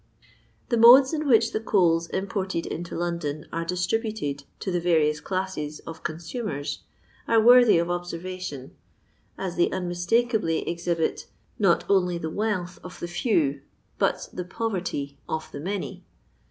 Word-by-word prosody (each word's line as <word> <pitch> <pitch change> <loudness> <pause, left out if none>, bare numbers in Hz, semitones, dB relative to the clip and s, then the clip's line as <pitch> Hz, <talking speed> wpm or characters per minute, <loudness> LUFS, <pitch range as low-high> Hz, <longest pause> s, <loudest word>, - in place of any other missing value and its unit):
The 235 - +2
modes 255 +5 +8
in 305 -1 -1
which 230 -3 +4
the 215 - -1
coals 170 -6 +2
imported 190 -3 -2
into 170 +1 -5
London 170 -4 -3
are 165 0 -1
distributed 180 - -2 0.2
to 190 - -2
the 175 - +1
various 160 -3 +2
classes 185 -6 -3
of 160 -1 -9
consumers 155 - -4 0.5
are 230 - +4
worthy 245 -2 +7
of 170 +1 0
observation, 175 -5 -5 0.6
as 185 -2 -4
they 175 - +3
un 185 -1 -3
mistakably 175 0 +1
exhibit 170 -1 -1 0.3
not 195 -5 +3
only 180 -3 +2
the 160 -1 -4
wealth 195 -4 -2
of 180 - -10
the 175 - -4
few, 170 - 0 0.4
but - - +1
the 180 - -4
poverty 180 -9 -3
of 160 0 -4
the - - -7
many. 195 +6 -4
175 Hz, 140 wpm, -25 LUFS, 165-210 Hz, 0.6 s, modes